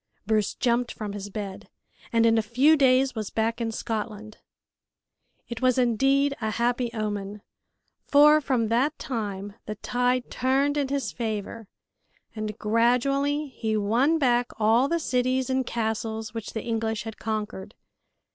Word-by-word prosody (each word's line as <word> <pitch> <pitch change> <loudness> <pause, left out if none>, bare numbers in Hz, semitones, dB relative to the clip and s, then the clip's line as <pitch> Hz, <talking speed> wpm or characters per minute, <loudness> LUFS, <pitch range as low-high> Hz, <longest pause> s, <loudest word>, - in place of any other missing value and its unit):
Bruce 215 -1 +1
jumped 240 0 +1
from 210 -2 -6
his 205 0 -6
bed, 200 -2 -7 0.4
and 230 -1 +3
in 225 0 +4
a 225 - +3
few 255 +8 +4
days 265 -2 +3
was 215 -3 -4
back 225 +1 -1
in 225 -1 -1
Scotland. 215 -1 -5 1.1
It 235 0 -6
was 255 -1 +3
indeed 270 +4 +2
a 220 - -1
happy 240 +2 0
omen, 210 -2 -4 0.6
for 300 +2 +6
from 250 -6 0
that 265 +7 +1
time 205 -5 -4
the 215 - -4
tide 245 +2 -1
turned 270 +3 +1
in 285 -2 0
his 275 0 -2
favor, 220 -1 -4 0.7
and 215 -1 -4
gradually 275 +7 +1
he 220 -4 -2
won 240 +10 +2
back 245 -4 +2
all 225 +4 +3
the 335 - +1
cities 255 -2 0
and 260 -1 0
castles 220 -1 -3
which 225 -2 -6
the 220 - -4
English 225 -2 -2
had 220 -1 -8
conquered. 215 -2 -4
230 Hz, 145 wpm, -26 LUFS, 215-260 Hz, 1.1 s, for